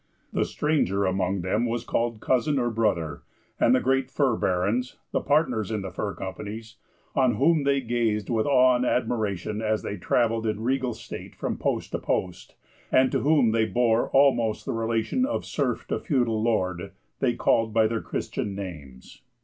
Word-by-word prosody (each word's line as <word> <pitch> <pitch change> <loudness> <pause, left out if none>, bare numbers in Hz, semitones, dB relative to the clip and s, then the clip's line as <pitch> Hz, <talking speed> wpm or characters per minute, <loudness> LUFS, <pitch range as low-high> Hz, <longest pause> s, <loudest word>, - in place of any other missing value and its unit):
The - - +1
stranger 120 - 0
among 95 0 0
them 105 +7 0
was 115 0 -2
called 115 -2 -1
Cousin, 140 +3 +1
or 120 -2 0
Brother, 105 -8 -1 0.4
and 125 - +5
the - - +3
great 135 0 +1
fur 135 -4 +1
barons, 105 +7 0 0.2
the - - 0
partners 130 - +1
in 105 -3 -2
the 95 - -5
fur 100 +2 -4
companies, 105 +4 -7 0.4
on 130 -4 +3
whom 155 +5 +3
they 140 -1 +2
gazed 115 -4 -1
with 115 -1 0
awe 130 -2 +5
and 125 - -1
admiration, 110 -5 -1
as 110 -1 0
they 100 - -4
travelled 115 +4 +1
in 110 0 -2
regal 130 -1 0
state - - -9
from - - -3
post - - -2
to - - -2
post, 90 -2 -3 0.4
and 130 0 +4
to - - +1
whom 140 -6 +3
they 110 0 +2
bore 115 +2 +1
almost 130 -5 +3
the - - -2
relation 115 - 0
of 285 +3 -1
serf - - -2
to - - -1
feudal 120 - 0
lord, 95 -4 -1 0.3
they 125 -3 +1
called 115 -1 +2
by 110 0 +3
their 115 0 -1
Christian 100 -2 -4
names. 75 -10 -9
115 Hz, 175 wpm, -26 LUFS, 105-125 Hz, 0.4 s, and